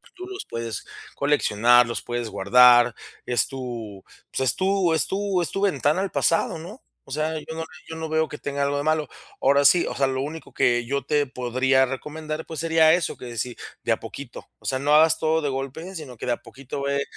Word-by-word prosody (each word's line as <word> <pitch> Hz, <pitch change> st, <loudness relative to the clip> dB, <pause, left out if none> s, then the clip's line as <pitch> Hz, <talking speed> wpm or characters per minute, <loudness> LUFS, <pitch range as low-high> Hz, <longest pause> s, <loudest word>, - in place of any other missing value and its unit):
Tú 365 Hz, 0 st, -8 dB
los 385 Hz, +1 st, -7 dB
puedes 115 Hz, -1 st, -5 dB, 0.3 s
coleccionar, 120 Hz, -4 st, +4 dB
los 115 Hz, -, -4 dB
puedes 120 Hz, -1 st, -3 dB
guardar. 120 Hz, +4 st, +6 dB, 0.3 s
Es 120 Hz, -4 st, +1 dB
tu, 120 Hz, -7 st, -7 dB, 0.3 s
pues -, -, -2 dB
es -, -, -10 dB
tú 190 Hz, -1 st, +2 dB
es 160 Hz, -, +1 dB
tú 195 Hz, -1 st, 0 dB
es 170 Hz, -, -2 dB
tu 195 Hz, -, -3 dB
ventana 175 Hz, -3 st, +2 dB
al 195 Hz, -, -2 dB
pasado, 165 Hz, 0 st, +1 dB
¿no? 195 Hz, +10 st, -10 dB, 0.2 s
O -, -, -14 dB
sea, 155 Hz, +3 st, -1 dB
yo 150 Hz, -, -8 dB
no 165 Hz, -, -3 dB, 0.3 s
yo 160 Hz, -, -6 dB
no 160 Hz, 0 st, -4 dB
veo 160 Hz, 0 st, 0 dB
que 150 Hz, -, -7 dB
tenga 140 Hz, -1 st, -3 dB
algo 140 Hz, 0 st, 0 dB
de 145 Hz, -, -1 dB
malo. 155 Hz, -2 st, 0 dB, 0.3 s
Ahora 140 Hz, +1 st, +4 dB
sí, 175 Hz, +4 st, +6 dB
o -, -, -4 dB
sea, 135 Hz, -1 st, +2 dB
lo 130 Hz, 0 st, -2 dB
único 155 Hz, +3 st, -7 dB
que 120 Hz, 0 st, +2 dB
yo 140 Hz, +3 st, -1 dB
te 145 Hz, 0 st, +2 dB
podría 130 Hz, +1 st, +2 dB
recomendar, 155 Hz, +4 st, -5 dB
pues 160 Hz, -2 st, -5 dB
sería 160 Hz, -1 st, +5 dB
eso, 175 Hz, -1 st, 0 dB
que 120 Hz, -2 st, -8 dB
si, 120 Hz, +2 st, -3 dB, 0.3 s
de -, -, 0 dB
a -, -, +2 dB
poquito. 140 Hz, -4 st, -9 dB
O -, -, -21 dB
sea, 130 Hz, -, -1 dB
no 145 Hz, +2 st, +3 dB
hagas 160 Hz, +1 st, +5 dB
todo 160 Hz, 0 st, +1 dB
de 145 Hz, -, -1 dB
golpe, 135 Hz, +8 st, -5 dB
sino 145 Hz, -7 st, -8 dB
que -, -, -6 dB
de -, -, +1 dB
a -, -, -3 dB
poquito 135 Hz, +1 st, -8 dB
ve, 140 Hz, 0 st, 0 dB
140 Hz, 225 wpm, -24 LUFS, 125-160 Hz, 0.3 s, guardar